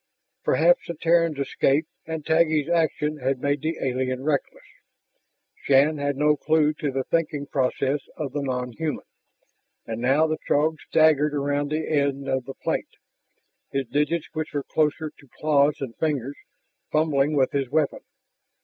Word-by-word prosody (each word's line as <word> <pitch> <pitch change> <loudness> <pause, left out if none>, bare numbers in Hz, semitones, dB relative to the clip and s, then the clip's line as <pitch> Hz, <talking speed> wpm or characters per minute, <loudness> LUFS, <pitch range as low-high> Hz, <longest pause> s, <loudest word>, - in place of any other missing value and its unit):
Perhaps - - +3
the 170 - -4
Terran's 165 -1 +2
escape 140 +2 +1 0.2
and 160 -2 -5
Taggi's 160 -2 +2
action 155 -3 0
had 135 -1 -1
made 145 +1 0
the 160 +1 -2
alien 130 0 -2
reckless. 145 -1 -2 1.0
Shann 145 +2 +4
had 145 -1 -1
no 150 +1 +3
clue 155 0 +2
to 145 - -1
the 135 0 -2
thinking 150 -2 -1
processes 135 +1 -1
of 145 -4 -3
the 145 - -1
non 125 -2 -2
human, 155 +4 -4 0.8
but 115 0 -5
now 135 +6 +3
the 155 0 -2
Throg 155 +2 +2
staggered 150 -2 +4
around 145 0 0
the 155 +1 -2
end 140 -2 0
of 130 -2 -1
the 135 - -8
plate, - - -2 0.8
his 135 -1 -1
digits, 150 +5 0
which 155 -1 -4
were 145 - -1
closer 155 +1 0
to 140 - -18
claws 150 -1 +3
than 130 -4 -5
fingers, 145 -4 -1 0.6
fumbling 150 -1 +2
with 135 -2 +2
his 135 -3 -1
weapon. 150 0 0
145 Hz, 155 wpm, -24 LUFS, 135-155 Hz, 1.0 s, Shann